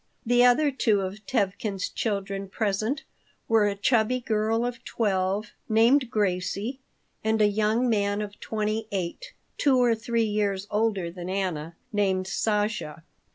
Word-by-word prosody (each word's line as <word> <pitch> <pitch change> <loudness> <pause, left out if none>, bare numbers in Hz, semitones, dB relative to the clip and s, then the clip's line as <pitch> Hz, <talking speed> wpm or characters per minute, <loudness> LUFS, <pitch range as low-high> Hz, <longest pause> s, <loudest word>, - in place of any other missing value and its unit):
The 245 +1 +4
other 265 +4 +5
two 220 -6 +2
of 195 +5 -6
Tevkin's 200 -5 -1
children 195 -2 -3
present 215 +6 -1 0.4
were 220 -2 +4
a 200 - -1
chubby 230 +4 +2
girl 225 0 0
of 245 -1 -5
twelve, 200 -2 -1 0.2
named 235 +4 +4
Gracie, 205 +4 -1 0.4
and 220 0 +1
a 210 - +5
young 215 +4 +1
man 205 -3 +1
of 205 0 -9
twenty 215 0 -2
eight, 195 - -4 0.3
two 275 -3 +4
or 245 -2 +4
three 230 +1 0
years 205 -2 0
older 205 -5 0
than 175 0 -7
Anna, 175 -4 -2 0.2
named 190 -2 +1
Sasha. 210 -4 -1
210 Hz, 140 wpm, -26 LUFS, 195-230 Hz, 0.4 s, other